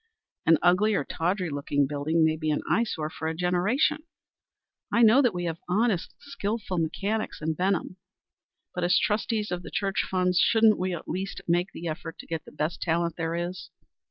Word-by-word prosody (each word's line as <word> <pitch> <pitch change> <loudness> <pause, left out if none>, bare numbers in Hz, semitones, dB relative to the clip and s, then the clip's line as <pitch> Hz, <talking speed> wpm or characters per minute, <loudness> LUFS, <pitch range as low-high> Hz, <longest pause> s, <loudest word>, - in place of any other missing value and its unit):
An 165 -1 +7
ugly 190 +5 +4
or 145 - +1
tawdry 180 0 -1
looking 145 0 0
building 150 +3 +1
may 155 0 +2
be 155 0 -2
an 150 - 0
eyesore 160 -9 0
for 160 - -5
a 160 - -2
generation. 185 - +1 0.9
I 235 - +4
know 230 +5 +7
that 245 -4 +3
we 175 -2 -4
have 165 -1 -3
honest 205 -1 +1
and - - -37
skilful 210 -8 -3
mechanics 200 +7 -2
in 160 +1 -1
Benham, 185 +2 -1 0.8
but 180 - -3
as 175 - +4
trustees 215 0 0
of 180 0 -2
the - - -9
church 195 -1 0
funds, 180 -1 +2
shouldn't 225 -1 +5
we 185 -1 -1
at 165 - -9
least 190 +3 -4
make 175 +2 +1
the 170 - -6
effort 165 0 -5
to - - -10
get 160 -1 -5
the - - -12
best 155 +3 -3
talent 170 -1 0
there 165 0 -2
is? 175 +2 -4
180 Hz, 190 wpm, -27 LUFS, 165-205 Hz, 0.9 s, An